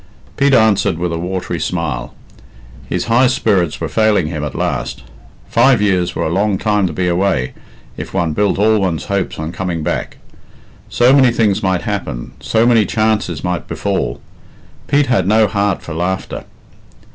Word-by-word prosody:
Pete 140 -1 +3
answered 110 -7 +3
with 85 0 -2
a 85 - -3
watery 90 -1 -3
smile. 75 -9 -3 0.7
His - - -1
high 120 +3 +4
spirits 90 - +1
were - - -2
failing 110 -6 +2
him 80 -3 -4
at 75 - -5
last. - - -3 0.4
Five 130 -4 +4
years 95 -4 +1
were - - -1
a 80 - -1
long 100 +2 +1
time 105 -2 +1
to - - -4
be 90 +3 -1
away, 90 -7 0 0.4
if - - -6
one 85 -4 -1
built 105 +3 +1
all 110 +2 +3
one's 90 -5 -1
hopes 100 -1 -1
on 80 +1 -4
coming 85 -2 -3
back. - - -3 0.7
So 125 +2 +4
many 130 -3 +5
things 110 -3 +1
might 95 -4 0
happen, - - -4
so 115 +1 +1
many 115 -4 +4
chances 110 -7 0
might 90 -1 -2
befall. - - -2 0.7
Pete 145 0 +3
had 115 -8 +1
no 110 +2 +4
heart 100 -1 -1
for 85 - -7
laughter. 90 +4 -3
95 Hz, 170 wpm, -16 LUFS, 85-110 Hz, 0.7 s, many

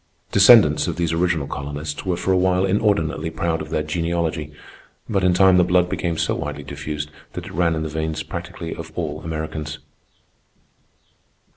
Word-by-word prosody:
Descendants 95 -8 +6
of 85 - -2
these 85 -2 -1
original 85 -3 +1
colonists 75 +3 -5
were 90 -2 0
for 95 - -1
a - - +4
while 90 +1 +2
inordinately 95 -6 +1
proud 80 0 -1
of 80 - -7
their 75 -1 -1
genealogy; 80 -1 -2 0.6
but 95 -3 0
in 90 - +4
time 95 0 +6
the 90 - +6
blood 90 0 +2
became 85 -3 -2
so - - 0
widely - - -4
diffused 75 +1 -5 0.2
that - - -6
it - - -9
ran 85 -1 +2
in 80 - -2
the - - -2
veins 80 0 -3
practically 85 -1 -6
of - - -8
all 75 -3 -3
Americans. 80 -2 -4
80 Hz, 170 wpm, -22 LUFS, 75-90 Hz, 0.6 s, Descendants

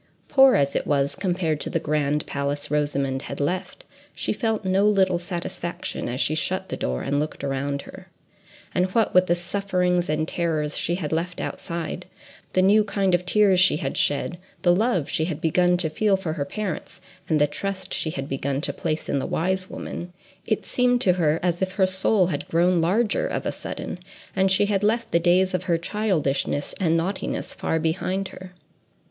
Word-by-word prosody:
Poor 270 -2 +7
as 140 -1 +1
it - - -1
was, 140 -1 +1
compared 175 -5 -1
to - - -2
the 165 - 0
grand 150 -1 0
place 140 0 -3
Rosamond 140 -3 0
had - - -6
left, 180 +6 -3 0.3
she - - -1
felt 220 -4 -1
no 190 +2 +3
little 190 -4 +3
satisfaction 175 -4 -4
as 125 +2 -3
she 155 - +2
shut 185 +4 -1
the - - -2
door, 65 0 -2
and 145 +1 0
looked 150 -1 -4
around 140 +1 -2
her. - - -12 0.7
And 180 +1 +2
what 225 -3 +3
with 185 0 +5
the 175 - +3
sufferings 180 -1 0
and 155 +1 0
terrors 155 -4 -1
she 170 - 0
had 165 -5 -4
left 170 +2 -2
outside, 170 -1 -4 0.5
the 185 - +3
new 210 +3 +5
kind 200 -2 0
of 180 0 +1
tears 200 -2 +4
she 185 -4 +5
had 135 -3 -3
shed, 155 +4 0 0.2
the 175 -1 +5
love 210 - +1
she 160 - 0
had 160 -3 -3
begun 175 +2 +3
to 175 -2 +1
feel 195 +5 +2
for 175 -5 -3
her 145 -3 -2
parents, 190 +2 -5 0.3
and 155 -2 +3
the 145 - +5
trust 190 +6 -4
she 160 - 0
had 135 -3 -4
begun 135 0 -2
to - - -1
place 160 -1 -3
in 140 - 0
the 135 - -3
wise 185 +2 -1
woman, 175 +1 -6 0.3
it - - 0
seemed 245 0 +2
to 180 - +4
her 165 -3 +1
as 175 0 0
if 190 0 -1
her 190 0 +3
soul 190 +1 +2
had 160 -5 -3
grown 175 +1 +3
larger 210 +6 +1
of - - -3
a - - 0
sudden, 180 - -6 0.4
and 190 0 +3
she 195 +2 +4
had 200 -1 0
left 225 +2 +1
the 170 - +4
days 185 +2 +3
of 185 0 -1
her 170 -2 +2
childishness 165 -8 -1
and 165 -3 +2
naughtiness 185 +4 -2
far 160 - -1
behind 185 +4 -1
her. 185 -1 -11
175 Hz, 195 wpm, -24 LUFS, 155-190 Hz, 0.7 s, Poor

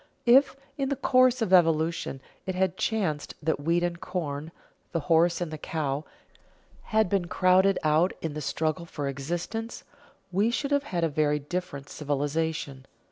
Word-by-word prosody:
If, 265 +4 +6 0.2
in 270 -1 0
the 280 - 0
course 255 -2 +3
of 190 - -1
evolution, 165 -5 +2 0.3
it 185 - -2
had 185 -1 +1
chanced 190 -10 -1
that 160 -1 0
wheat 170 +4 +1
and 175 -1 -2
corn, 155 -4 -4 0.4
the 165 - 0
horse 165 +3 +3
and 170 -3 -2
the 155 - -6
cow, 150 -2 -2 0.8
had 220 -1 +2
been 180 -2 0
crowded 185 +2 +4
out 155 +4 +3
in 160 -2 -4
the 150 - -5
struggle 160 +4 -2
for 145 -3 -4
existence, 175 - -4 0.5
we 200 +5 +2
should 280 +4 -2
have 285 0 +2
had 175 -9 -2
a - - +4
very 150 -1 +1
different 150 -2 -5
civilization. 145 -1 -2
170 Hz, 160 wpm, -27 LUFS, 150-190 Hz, 0.8 s, If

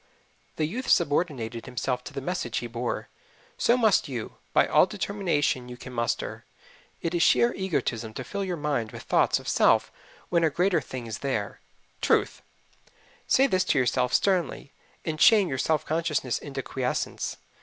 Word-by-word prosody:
The 155 - 0
youth 235 +12 -4
subordinated 140 -8 +1
himself 125 0 -2
to - - -7
the 135 - -4
message 175 -10 -2
he - - -2
bore. 120 +1 -3 0.5
So 240 - +4
must 220 -8 +3
you, 120 -5 -6
by - - +4
all - - +4
the 210 - -8
determination 165 -11 0
you 125 - -8
can 130 0 -10
muster. 115 -1 -2 0.6
It 165 - -1
is 175 - +1
sheer 235 +6 +4
egotism 125 - -2
to - - -4
fill 200 +10 -4
your 180 -2 -3
mind 140 -7 -2
with - - -8
thoughts - - +3
of - - -10
self - - +3 0.4
when 170 -1 +2
a 160 - +4
greater 175 +2 +1
thing 130 -2 -7
is 110 -1 -5
there 110 -7 -3 0.4
TRUTH. - - +1 0.9
Say 265 - +5
this 185 -8 +2
to - - +1
yourself 125 0 +2
sternly, 180 -6 +1 0.3
and 155 -1 -3
shame 210 -4 +7
your 130 - -2
self 155 +2 +1
consciousness 155 -6 -1
into 135 -2 -6
quiescence. 130 -2 -3
145 Hz, 170 wpm, -27 LUFS, 125-180 Hz, 0.9 s, shame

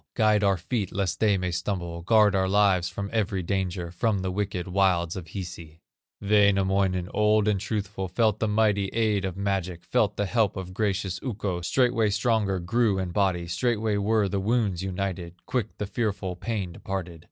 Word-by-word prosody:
Guide 110 -3 +3
our 100 -2 +3
feet 100 +4 -3
lest 95 -3 -2
they 105 -3 +3
may 90 -1 -2
stumble, 85 -1 -3
Guard 105 +2 +4
our 95 -1 +1
lives 95 -3 +3
from 100 0 -5
every 100 -4 0
danger, 90 -2 -2
From 100 +4 0
the 95 - -1
wicked 95 -2 -3
wilds 90 -2 +1
of 90 -3 -7
Hisi." 85 -4 -8 0.4
Wainamoinen, 100 -3 +2
old 105 0 +3
and 105 -2 +2
truthful, 100 -2 -3
Felt 110 +3 +1
the 110 - +1
mighty 105 -2 +2
aid 110 -3 +1
of 95 -1 -4
magic, 95 -3 -2
Felt 105 -1 +1
the 105 - 0
help 110 -1 +1
of 95 -1 -6
gracious 95 -3 -1
Ukko, 100 -7 -3
Straightway 120 +2 +2
stronger 105 -2 +1
grew 105 +3 +1
in 95 -2 -2
body, 90 -2 +1
Straightway 105 +4 0
were 105 0 +2
the 100 0 -1
wounds 100 -3 0
united, 95 -2 -4
Quick 115 -4 -2
the 105 - -3
fearful 100 -4 -2
pain 100 -1 -3
departed. 90 -1 -5
100 Hz, 175 wpm, -26 LUFS, 90-105 Hz, 0.4 s, Guard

